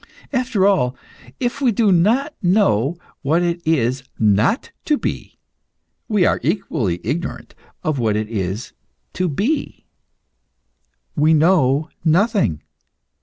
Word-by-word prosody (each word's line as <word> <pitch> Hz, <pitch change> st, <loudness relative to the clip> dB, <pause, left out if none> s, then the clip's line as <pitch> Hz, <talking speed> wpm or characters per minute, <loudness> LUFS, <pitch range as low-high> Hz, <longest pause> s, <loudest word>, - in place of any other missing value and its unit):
After 250 Hz, -7 st, +1 dB
all, 135 Hz, -11 st, +2 dB, 0.4 s
if 245 Hz, +3 st, -2 dB
we 255 Hz, -3 st, +3 dB
do 215 Hz, -1 st, +2 dB
not 230 Hz, -, +2 dB
know 175 Hz, -, +2 dB, 0.2 s
what 160 Hz, +5 st, +1 dB
it 170 Hz, 0 st, -1 dB
is 130 Hz, -4 st, +1 dB, 0.2 s
not 105 Hz, -, +2 dB
to 300 Hz, -, +2 dB
be, -, -, -5 dB, 0.7 s
we 210 Hz, -6 st, +2 dB
are -, -, +2 dB
equally 130 Hz, -, -1 dB
ignorant 160 Hz, +9 st, -4 dB, 0.3 s
what 125 Hz, -10 st, 0 dB
it 105 Hz, 0 st, -1 dB
is 100 Hz, +1 st, -4 dB, 0.4 s
to 185 Hz, -1 st, -1 dB
be. 225 Hz, -, -2 dB, 1.3 s
We 155 Hz, 0 st, +4 dB
know 155 Hz, -3 st, +3 dB, 0.2 s
nothing. 180 Hz, -, +2 dB
165 Hz, 115 wpm, -20 LUFS, 125-205 Hz, 1.3 s, We